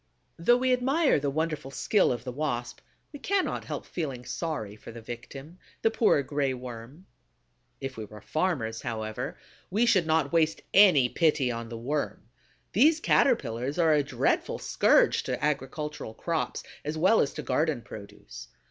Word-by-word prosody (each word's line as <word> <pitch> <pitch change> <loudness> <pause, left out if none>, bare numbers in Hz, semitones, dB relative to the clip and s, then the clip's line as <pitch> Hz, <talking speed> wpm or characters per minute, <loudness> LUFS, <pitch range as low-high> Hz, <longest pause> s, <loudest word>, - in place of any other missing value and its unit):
Though 240 +9 +4
we 255 0 +2
admire 270 - +2
the 140 0 -1
wonderful 155 -1 -2
skill 195 +8 +2
of 120 -2 -3
the 125 - -5
Wasp, 120 -4 -3 0.3
we 290 - -8
cannot 390 +6 -1
help - - -5
feeling 135 -8 -5
sorry 115 -13 -4
for 105 - -11
the 115 - -9
victim, 135 +8 -9 0.2
the 225 - +4
poor 215 -11 +3
Gray 140 -1 -1
Worm. 125 +6 -9 0.7
If 135 -2 -6
we 110 - -5
were 105 +1 -12
farmers, 130 - -1
however, 110 -3 -4 0.3
we 215 +6 +2
should 185 -8 +3
not 160 -2 +1
waste 160 -1 +2
any 180 -10 +7
pity 150 -3 +1
on 115 -1 -5
the 115 - -6
Worm. 140 +6 -3 0.4
These 305 - +5
Caterpillars 140 - +1
are 165 -3 +4
a 150 - +4
dreadful 140 - 0
scourge - - +3
to - - -2
agricultural 150 -3 -3
crops, 165 -2 -2 0.2
as 150 +2 -3
well 190 +8 +4
as 140 - 0
to - - -6
garden 150 -6 0
produce. 100 -2 -11
150 Hz, 160 wpm, -28 LUFS, 120-170 Hz, 0.7 s, any